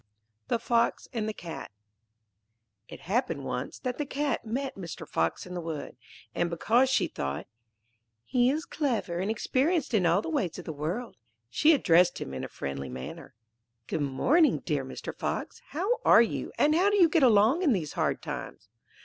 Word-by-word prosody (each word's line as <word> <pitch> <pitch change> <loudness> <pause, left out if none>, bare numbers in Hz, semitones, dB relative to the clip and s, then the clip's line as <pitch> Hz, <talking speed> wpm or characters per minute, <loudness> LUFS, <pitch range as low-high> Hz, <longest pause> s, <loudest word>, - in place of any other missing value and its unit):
The - - +1
Fox 235 0 +1
and 220 -2 -1
the - - -1
Cat 170 -6 -8 1.2
It - - -11
happened 175 - -1
once 125 +1 -4
that 250 +1 -4
the 295 - 0
Cat 285 -1 -1
met 260 +5 -3
Mr. 175 -4 -7
Fox 80 0 -1
in 180 - -8
the 175 - -3
wood, 160 -3 -5 0.4
and 175 - 0
because 230 +10 +2
she 265 - +2
thought: 70 +5 -4 0.8
'He 250 -1 +3
is 310 +4 -1
clever 230 - -1
and 190 +3 -1
experienced 270 +7 0
in 190 -5 +3
all 175 +5 +3
the - - -5
ways 280 - -1
of 180 - -8
the 160 - -4
world,' 170 - -4 0.3
she 310 - +5
addressed 180 - +4
him 65 - -6
in 65 - -4
a - - -3
friendly 70 0 -5
manner. 65 +10 -8 0.5
'Good 155 - -2
morning, 255 - +3
dear - - 0
Mr. - - -7
Fox! - - -4
how 400 +10 -1
are 230 - +7
you 230 - -3
and 300 - +4
how 365 +5 +4
do 410 - +2
you 355 -4 +7
get 325 0 +2
along 235 - +5
in 325 -7 +3
these 170 - -1
hard - - -1
times?' - - -7
220 Hz, 185 wpm, -28 LUFS, 165-280 Hz, 1.2 s, are